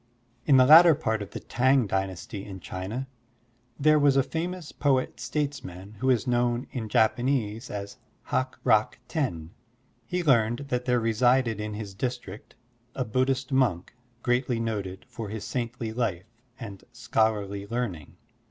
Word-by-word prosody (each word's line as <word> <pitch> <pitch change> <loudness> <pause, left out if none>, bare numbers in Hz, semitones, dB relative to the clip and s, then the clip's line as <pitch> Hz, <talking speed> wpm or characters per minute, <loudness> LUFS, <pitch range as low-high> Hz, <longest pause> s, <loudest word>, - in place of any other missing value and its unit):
In 140 - +6
the 130 - +7
latter 165 +3 +9
part 110 -5 -1
of 100 - -6
the - - -6
T'ang 130 0 +2
Dynasty 95 0 -3
in 95 -2 -8
China, 95 +9 -5 0.7
there 155 +1 +5
was 140 -1 +4
a 135 - +5
famous 170 +2 -4
poet 135 -3 0
statesman 110 - -4
who 130 - +1
is 125 -1 +2
known 120 0 +1
in 115 -4 -4
Japanese 120 0 +1
as 100 +2 -6 0.3
Hak 130 0 -2
Rak 110 +2 +3
Ten. 90 - -2 0.6
He 180 -1 -1
learned 120 -6 +3
that 125 -1 -1
there 125 -1 +2
resided 115 0 +2
in 105 0 -4
his 105 -2 -6
district 120 -3 -5 0.4
a 130 - -1
Buddhist 130 +3 0
monk 125 -10 +1 0.3
greatly 125 -1 +1
noted 100 -5 -4
for 110 -3 -7
his 105 0 -5
saintly 115 -1 -3
life 110 -3 -3 0.3
and 100 -6 -8
schol 115 -1 +1
arly 100 0 -6
learning. 105 -11 -4
120 Hz, 150 wpm, -27 LUFS, 105-130 Hz, 0.7 s, latter